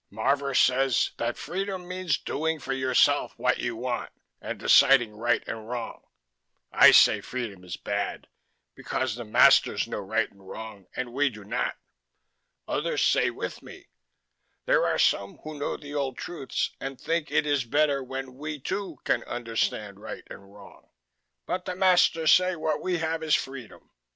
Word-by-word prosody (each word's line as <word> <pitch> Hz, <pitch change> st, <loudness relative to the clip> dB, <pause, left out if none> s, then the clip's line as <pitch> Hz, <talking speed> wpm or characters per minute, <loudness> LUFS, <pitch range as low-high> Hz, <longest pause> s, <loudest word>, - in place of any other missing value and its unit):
Marvor 135 Hz, +6 st, 0 dB
says 130 Hz, 0 st, +3 dB
that 120 Hz, 0 st, -2 dB
freedom 190 Hz, -1 st, -4 dB
means 185 Hz, -6 st, -1 dB
doing 160 Hz, +2 st, -2 dB
for 135 Hz, -, -4 dB
yourself 130 Hz, -1 st, +2 dB
what -, -, +1 dB
you 120 Hz, -, -2 dB
want 120 Hz, +1 st, -3 dB, 0.3 s
and -, -, -5 dB
deciding 120 Hz, -6 st, +5 dB
right 120 Hz, +2 st, 0 dB
and 110 Hz, 0 st, -6 dB
wrong. 120 Hz, -2 st, -6 dB, 0.6 s
I -, -, +8 dB
say -, -, +6 dB
freedom 115 Hz, -8 st, -6 dB
is 90 Hz, -2 st, -6 dB
bad -, -, -3 dB, 0.5 s
because 130 Hz, -3 st, -2 dB
the 120 Hz, +2 st, -6 dB
masters 110 Hz, -, +4 dB
know -, -, -4 dB
right 110 Hz, +4 st, 0 dB
and 100 Hz, -1 st, -17 dB
wrong 110 Hz, -3 st, -9 dB
and 125 Hz, -1 st, -4 dB
we 140 Hz, +2 st, +2 dB
do 105 Hz, -4 st, -12 dB
not. 100 Hz, -, -2 dB, 0.9 s
Others -, -, -1 dB
say -, -, +3 dB
with -, -, -6 dB
me: -, -, -13 dB, 0.8 s
there -, -, +3 dB
are -, -, 0 dB
some 100 Hz, 0 st, +1 dB
who 155 Hz, -1 st, -8 dB
know 145 Hz, -, -2 dB
the 145 Hz, -1 st, -10 dB
old 140 Hz, -3 st, -2 dB
truths 160 Hz, -6 st, -3 dB
and 135 Hz, -1 st, -6 dB
think 165 Hz, +1 st, -1 dB
it -, -, +1 dB
is 145 Hz, -3 st, +1 dB
better 140 Hz, +2 st, +1 dB
when 130 Hz, 0 st, -6 dB
we, 150 Hz, +1 st, -5 dB
too, 180 Hz, +2 st, -4 dB
can 120 Hz, -, 0 dB
understand 115 Hz, -4 st, -3 dB
right 110 Hz, -, -8 dB
and 100 Hz, 0 st, -12 dB
wrong. 100 Hz, -1 st, -16 dB, 0.6 s
But 180 Hz, -, -3 dB
the 180 Hz, -, -4 dB
masters 180 Hz, -4 st, +4 dB
say 185 Hz, 0 st, +3 dB
what 155 Hz, -2 st, -2 dB
we 180 Hz, -1 st, -1 dB
have 160 Hz, 0 st, -2 dB
is 155 Hz, -1 st, +3 dB
freedom. 135 Hz, -4 st, -7 dB
135 Hz, 165 wpm, -26 LUFS, 115-155 Hz, 0.9 s, I